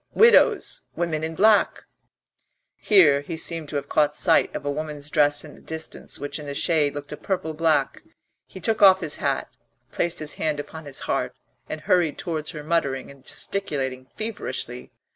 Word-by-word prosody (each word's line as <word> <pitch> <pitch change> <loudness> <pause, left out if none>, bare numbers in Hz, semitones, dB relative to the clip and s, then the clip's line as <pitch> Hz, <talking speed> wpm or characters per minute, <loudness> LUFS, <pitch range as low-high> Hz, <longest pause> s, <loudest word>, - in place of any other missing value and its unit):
Widows! 460 +1 +5
Women 160 -3 -1
in 160 0 -3
black 210 +2 +3 0.5
" - - -52
Here 160 -9 +6
he 160 +3 -6
seemed 160 -1 -2
to - - -6
have 140 -1 -2
caught 150 0 +2
sight 165 0 +3
of - - -5
a 145 - 0
woman's 150 -1 -5
dress 145 -2 +3
in 150 - -11
the - - -16
distance, 160 0 -5
which 145 +2 -4
in 150 - -8
the 140 - -5
shade 150 -4 +2
looked 145 0 -7
a 150 - -5
purple 160 -1 -3
black. 155 -3 +1 0.5
He 190 - -11
took 220 +5 0
off 190 -1 +7
his 155 -4 -2
hat, - - -1 0.4
placed 170 - -1
his 155 -1 -4
hand 155 -2 0
upon 155 +2 -8
his 140 -2 -7
heart, - - -2 0.3
and 155 - -5
hurried 170 -2 +2
towards 155 -3 -3
her 150 -2 -7
muttering 140 -5 -1
and 140 -2 -17
gesticulating 135 -9 -3
feverishly. 130 - -5
155 Hz, 180 wpm, -24 LUFS, 145-170 Hz, 0.5 s, off